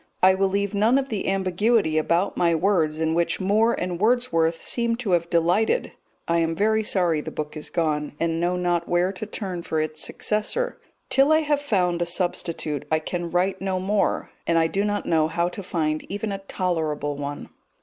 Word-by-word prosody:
I 190 0 +7
will 195 +1 +2
leave 200 +1 -1
none 220 +6 +3
of 275 0 -1
the 215 -3 -3
ambiguity 190 -2 +2
about 170 +5 0
my 170 -1 +2
words 160 -3 +1
in 160 0 +1
which 170 +1 0
Moore 215 +4 +3
and 180 0 -3
Wordsworth 170 -9 +2
seem 235 -1 0
to 230 -5 -3
have 170 -1 +1
delighted. 175 - +2 0.4
I 170 0 +2
am 165 0 0
very 220 +3 +2
sorry 175 -7 +1
the - - -6
book 150 0 -5
is 155 - -6
gone, 150 -3 -1
and 165 0 0
know 175 +1 +1
not 175 -1 0
where 175 +2 +2
to 205 +3 -6
turn 190 -5 -5
for 160 -2 -2
its 155 0 -2
successor. 215 - -1 0.3
Till 275 +3 +4
I 315 0 +5
have 295 -2 0
found 180 -10 0
a 175 - 0
substitute 165 -4 -2
I 155 - +4
can 170 +2 -4
write 185 +2 0
no 190 -1 -1
more, 200 +2 0 0.2
and 170 - +3
I 165 - +4
do 195 +5 0
not 205 0 -1
know 160 -2 +2
how 170 +2 0
to 190 - -7
find 155 -4 -1
even 205 +1 -3
a 195 - -3
tolerable 160 -6 -2
one. 145 0 -6
180 Hz, 200 wpm, -24 LUFS, 165-205 Hz, 0.4 s, I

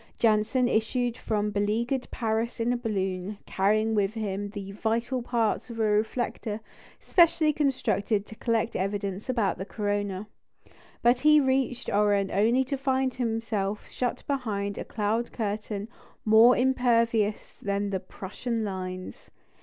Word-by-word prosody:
Janssen 225 +3 +3
issued 240 +1 0
from 210 -3 -1
beleaguered 225 +6 0
Paris 225 +1 -2
in 235 +2 +1
a - - 0
balloon, 195 -4 -2
carrying 215 +3 +1
with 205 0 +1
him 205 -2 -3
the 200 -1 -7
vital 230 +5 -1
parts 235 0 0
of 230 -1 -7
a - - +2
reflector 215 0 0 0.4
specially 330 -3 +4
constructed 235 -8 0
to - - -11
collect 230 0 -1
evidence 200 +2 -2
about 225 -8 0
the - - -2
corona. 205 -1 -2 0.8
But 245 +1 +5
he 300 +2 +6
reached 265 -2 0
Oran 205 -1 +2
only 230 +6 +3
to 270 +2 -3
find 265 -1 +1
himself 225 -4 -2
shut 250 -1 -3
behind 210 -7 -2
a - - -4
cloud 225 +2 -1
curtain 210 -1 -3 0.4
more 225 +3 +7
impervious 230 -4 +1
than 200 0 -1
the 190 - 0
Prussian 215 +5 -4
lines. 185 -2 -6
220 Hz, 135 wpm, -27 LUFS, 205-245 Hz, 0.8 s, more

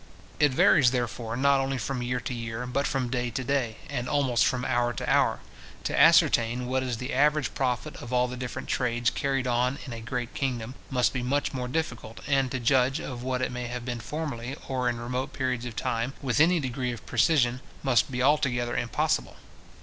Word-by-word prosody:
It 150 -2 +5
varies, 130 0 +5
therefore, 120 -2 -2
not 140 +1 +4
only 135 0 -1
from 125 +2 -3
year 125 +1 -1
to 125 - -4
year, 115 0 -4
but 140 +3 -1
from 130 -3 -1
day 125 -1 -1
to 130 +3 -3
day, 125 -4 0
and 125 -3 -3
almost 135 -5 +2
from 125 -2 -1
hour 120 0 +1
to - - -5
hour. - - +2 0.4
To - - -1
ascertain 120 +2 +5
what 130 +1 0
is 125 -3 -2
the 125 +4 -4
average 150 +2 +2
profit 125 -3 -1
of 120 - -9
all 125 0 +3
the 125 - -6
different 125 -1 -5
trades 120 -2 +1
carried 135 -2 -1
on 125 +2 +1
in 130 - -6
a 115 - -7
great 120 0 -4
kingdom, 125 -3 -2 0.2
must 125 -2 +2
be 130 - -2
much 140 +4 0
more 125 -2 -3
difficult; 125 -6 -4
and 135 -2 +2
to 130 - -3
judge 130 +3 +3
of 125 -3 -6
what 130 0 -1
it - - -1
may 125 0 -4
have 125 0 -5
been 120 -1 -3
formerly, 135 -2 -4
or 130 -2 0
in 120 - -2
remote 125 +2 -3
periods 125 -2 -2
of 120 -2 -6
time, 115 +5 -2
with 135 -1 0
any 170 +3 +5
degree 125 -2 -2
of 120 -4 -8
precision, 125 -6 +2 0.2
must 130 -2 +3
be 125 -1 -1
altogether 125 -4 +2
impossible. 120 - 0
125 Hz, 205 wpm, -27 LUFS, 120-135 Hz, 0.4 s, It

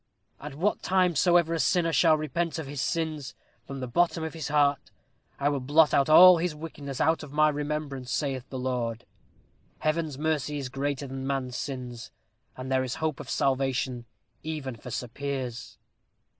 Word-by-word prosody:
'At 145 -1 -8
what 190 +8 0
time 185 -2 +2
soever 170 +1 +3
a 165 - -1
sinner 165 0 +2
shall 160 +1 +5
repent 160 +3 -2
him 160 - -3
of - - -11
his 140 -1 -4
sins, 155 -4 -2 0.3
from 135 -1 -6
the 125 - -3
bottom 170 +5 +1
of 160 - -4
his 160 -3 -5
heart, 145 -2 +2 0.5
I 140 - +1
will 145 -1 -1
blot 150 +4 +4
out 140 +2 +3
all 180 +3 +9
his 170 -2 -1
wickedness 145 -3 -7
out 160 +1 +2
of 150 -3 -9
my 155 +1 +4
remembrance, 145 -3 -4
saith 135 -3 -2
the 130 - -5
Lord.' 125 -3 -2 0.7
Heaven's 155 -2 -1
mercy 150 -1 -1
is 135 -3 -4
greater 140 +1 -2
than 135 0 -5
man's 135 -2 -2
sins. 125 -4 -6 0.5
And 130 +1 -6
there 130 0 +2
is 130 -1 -3
hope 155 -2 -2
of - - -8
salvation 130 -2 0 0.4
even 150 -5 -5
for 115 - -10
Sir 125 +1 -4
Piers." 130 -2 -5
145 Hz, 180 wpm, -27 LUFS, 130-160 Hz, 0.7 s, all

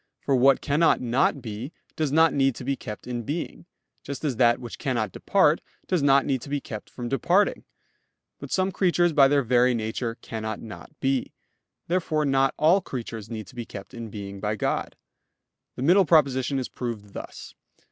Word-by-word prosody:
For 140 - +1
what 135 +2 +5
cannot 155 +3 +3
not 125 +2 +1
be, 115 +5 -6 0.2
does 155 -3 -1
not 160 +2 +5
need 135 -3 +2
to - - -8
be 140 - -1
kept 105 -5 -8
in 120 -1 -3
being; 160 +7 -5 0.3
just 140 +2 -6
as 135 -6 -1
that 120 -1 +4
which 120 -2 -9
cannot 120 -8 -1
depart, - - +2 0.2
does 180 -4 0
not 140 -1 +4
need 135 -3 0
to 140 - -9
be 145 0 -1
kept 110 -5 -8
from 120 -1 -6
departing. 175 +10 +1 0.7
But - - -8
some 190 0 +1
creatures 175 -2 +2
by 140 -3 +7
their 140 0 +2
very 125 +1 +3
nature 115 +1 -3
cannot 110 -2 -5
not 110 -2 -10
be. 135 -1 0 0.5
Therefore 165 -3 0
not 135 -1 +2
all 170 +6 +4
creatures 115 - -6
need 110 -2 -5
to 130 - -16
be 120 - -4
kept 100 -4 -10
in 115 -2 -7
being 100 -1 -7
by 105 +1 -1
God. - - -2 0.8
The 125 - -4
middle 185 +6 +5
proposition 140 -4 +3
is 130 - -2
proved 110 -5 -6
thus. - - -9
130 Hz, 185 wpm, -25 LUFS, 115-145 Hz, 0.8 s, by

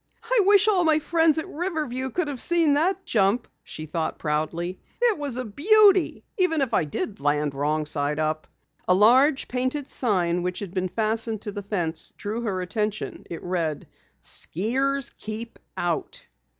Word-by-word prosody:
"I 470 0 +3
wish 410 +1 +6
all 385 -4 +4
my 315 -2 +4
friends 320 0 +2
at 320 +3 -2
Riverview 305 -8 -3
could 345 +4 -1
have 275 -4 -2
seen 335 -4 +3
that 365 +6 +1
jump!" 210 +3 +2 0.2
she 155 - -7
thought 160 +1 -3
proudly. 165 +4 -2 0.2
"It 470 -8 +2
was 280 -4 -2
a 255 - -3
beauty 390 - +4 0.2
even 325 -5 +2
if 255 -4 -1
I 175 - +3
did 195 +7 -4
land 145 0 0
wrong 150 +2 0
side 150 -1 -1
up." 155 0 -1 0.4
A 185 - +5
large 260 +8 +5
painted 255 +3 -2
sign 180 -7 0
which 180 0 -2
had 195 -4 -6
been 185 -1 -1
fastened 220 +1 -1
to 210 - -3
the 205 - -5
fence, 175 -5 -3
drew 215 +3 -4
her 195 -5 -2
attention. 210 +3 -3
It 170 - -7
read: 170 -4 -2 0.4
"Skiers 265 - -1
Keep 220 +2 -7 0.2
Out." 175 -2 -2
220 Hz, 165 wpm, -25 LUFS, -, 0.4 s, wish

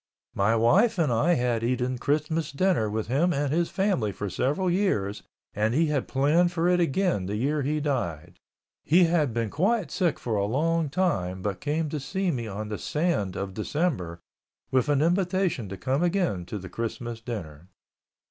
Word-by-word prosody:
My 100 +3 +2
wife 185 - +4
and 155 -8 +2
I 165 +10 +3
had 120 -4 0
eaten 125 +1 -1
Christmas 150 +3 -1
dinner 145 - +1
with 110 +1 -2
him 145 - +2
and 145 -2 0
his 170 +1 +1
family 190 - 0
for 100 0 -5
several 150 - 0
years 170 - 0 0.3
and 110 +3 0
he 165 +3 +4
had 140 - -1
planned 155 +6 +3
for 170 -1 0
it 180 0 +3
again 170 - +1
the 100 - -2
year 145 +7 0
he 150 +3 0
died. 120 - -3 0.4
He 175 +4 +5
had 165 -6 +2
been 115 -2 -2
quite 200 +5 +1
sick 175 -6 +1
for 115 -3 -2
a 100 - +1
long 160 +7 0
time 95 - -1
but 95 -2 -3
came 155 +2 -1
to 150 - -3
see 190 +7 -1
me 120 -6 -3
on 105 +1 -5
the 105 - -4
sand 150 - -1
of 95 -1 -4
December 105 - -2 0.5
with 130 +3 +2
an 145 0 +3
invitation 180 - 0
to 100 - -6
come 130 - -1
again 175 - 0
to 105 - -4
the 95 -1 -8
Christmas 115 +3 -5
dinner. 90 - -7
140 Hz, 185 wpm, -26 LUFS, 110-170 Hz, 0.5 s, He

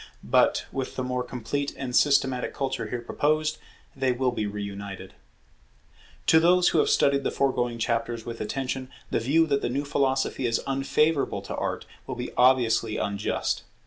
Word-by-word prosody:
But, - - +3
with 135 -1 -4
the 130 - -2
more 125 0 -1
complete 125 +4 -3
and 125 -2 -4
systematic 135 -3 +2
culture 135 -1 -2
here 120 - -3
proposed, 155 +4 0 0.4
they 130 -1 +1
will 125 +1 +1
be 110 -3 -2
re 105 0 -4
united. 100 -1 -7 1.1
To 160 - +6
those 180 +2 +5
who - - +2
have 435 - +3
studied 140 - +3
the - - +1
foregoing 120 -3 0
chapters 115 0 -1
with 115 -1 -6
attention, 130 +3 -3 0.2
the - - +2
view 145 +8 +3
that 140 -3 0
the - - -1
new 140 +4 -2
philosophy 135 -2 0
is 115 - +1
unfavourable 140 +2 +1
to - - -5
Art, - - -3 0.2
will - - -4
be - - -5
obviously 120 -3 +3
unjust. 100 0 -1
130 Hz, 170 wpm, -26 LUFS, 115-140 Hz, 1.1 s, To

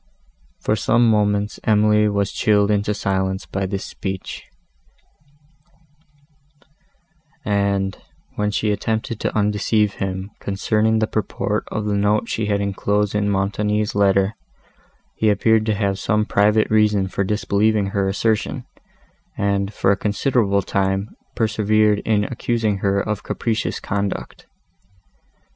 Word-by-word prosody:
For 105 - 0
some 120 +2 +3
moments 105 -1 +1
Emily 105 -1 +3
was 100 -1 0
chilled 105 -1 +2
into 105 0 +1
silence 95 -1 -1
by 95 0 -3
this 95 0 -4
speech; 95 -1 -6 3.0
and, 100 -2 0 0.4
when 105 0 0
she 105 +1 0
attempted 110 +3 -2
to - - -2
undeceive 105 0 +1
him, 95 +1 -3
concerning 110 +3 0
the 110 - +2
purport 110 -2 -2
of 110 -1 -2
the 105 - 0
note 105 +2 +1
she 110 -2 -1
had 100 -1 0
inclosed 100 +1 0
in 105 0 0
Montoni's 105 +2 0
letter, 100 0 +2 0.8
he 110 - +1
appeared 110 +2 +2
to 110 - +1
have 100 -2 -1
some 105 -1 +1
private 105 +2 +2
reason 105 -3 +3
for 100 - -2
disbelieving 105 0 +1
her 100 -1 0
assertion, 105 +3 -1 0.7
and, 100 0 0
for 100 -1 +1
a - - +3
considerable 100 -1 +1
time, 95 +2 -1 0.3
persevered 110 -1 +2
in 105 -2 +1
accusing 115 -2 -1
her 100 0 +1
of 105 +1 -2
capricious 115 -2 -2
conduct. 100 -1 -4
105 Hz, 125 wpm, -21 LUFS, 100-110 Hz, 3.0 s, some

